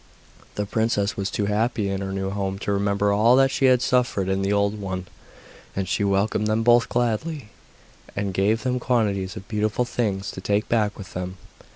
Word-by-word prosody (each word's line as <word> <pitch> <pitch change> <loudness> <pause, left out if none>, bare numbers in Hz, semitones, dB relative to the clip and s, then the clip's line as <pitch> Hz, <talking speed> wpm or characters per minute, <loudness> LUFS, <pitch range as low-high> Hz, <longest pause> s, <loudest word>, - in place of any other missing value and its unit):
The 105 - -1
princess 105 -1 0
was 100 0 -2
too 105 - -1
happy 105 +1 0
in 100 0 -2
her 95 0 -3
new 95 0 -2
home 95 -1 -2
to 100 - -3
remember 100 0 +1
all 115 +4 +5
that 135 0 +4
she 135 - +1
had 125 -1 +4
suffered 125 -7 +1
in 95 0 0
the 95 +1 0
old 100 +1 +1
one, 95 -2 -4 0.7
and 95 -1 -2
she - - 0
welcomed 100 +2 +1
them 110 +1 +1
both 120 0 +4
gladly, 120 +2 -1 0.7
and 100 -1 -2
gave 105 +4 +1
them 125 -1 0
quantities 105 -7 0
of 95 - -9
beautiful 110 +2 0
things 100 -5 -2
to 95 - -8
take 100 +2 0
back 105 -3 +1
with 100 - -10
them. 90 +1 -5
105 Hz, 195 wpm, -24 LUFS, 100-115 Hz, 0.7 s, all